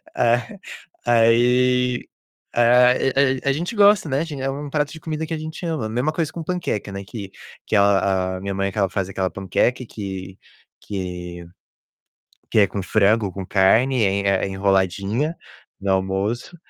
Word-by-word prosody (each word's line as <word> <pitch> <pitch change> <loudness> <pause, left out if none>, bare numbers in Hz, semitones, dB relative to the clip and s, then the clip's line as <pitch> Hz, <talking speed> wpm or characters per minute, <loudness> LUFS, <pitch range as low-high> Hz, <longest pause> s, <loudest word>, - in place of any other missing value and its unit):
É. 120 - +1 0.5
Aí, 125 +2 +3 0.5
a 125 +1 +5 0.5
a 140 - +1
a - - +4
gente 175 +10 -4
gosta, 205 -5 +5
né, 135 0 0
a - - 0
gen 150 -5 -6
é 135 - -1
um 145 +2 -5
prato 145 0 -1
de 160 - -9
comida 160 0 -4
que 160 - -5
a - - -2
gente 155 +3 -7
ama. 155 -10 -2
Mesma 125 +7 0
coisa 160 -1 -2
com 170 - -6
panqueca, 160 - -3
né, 100 0 -6
que 100 -4 -8 0.3
que - - -1
a 95 -2 +2
a - - -9
minha 100 0 -3
mãe 100 0 -1
que - - -12
ela 100 -2 +2
faz 95 0 -3
aquela 95 -1 -1
panqueca 110 +6 0
que 95 -3 -7 0.4
que 90 -3 -6 1.1
que - - +2
é 100 - +6
com 100 0 -5
frango, 105 +1 +2
com 95 0 -6
carne, 115 +7 +3
é 100 0 +1
é - - -4
enroladinha 100 - 0 0.4
no 95 0 0
almoço 95 - -2
110 Hz, 170 wpm, -22 LUFS, 95-140 Hz, 1.1 s, é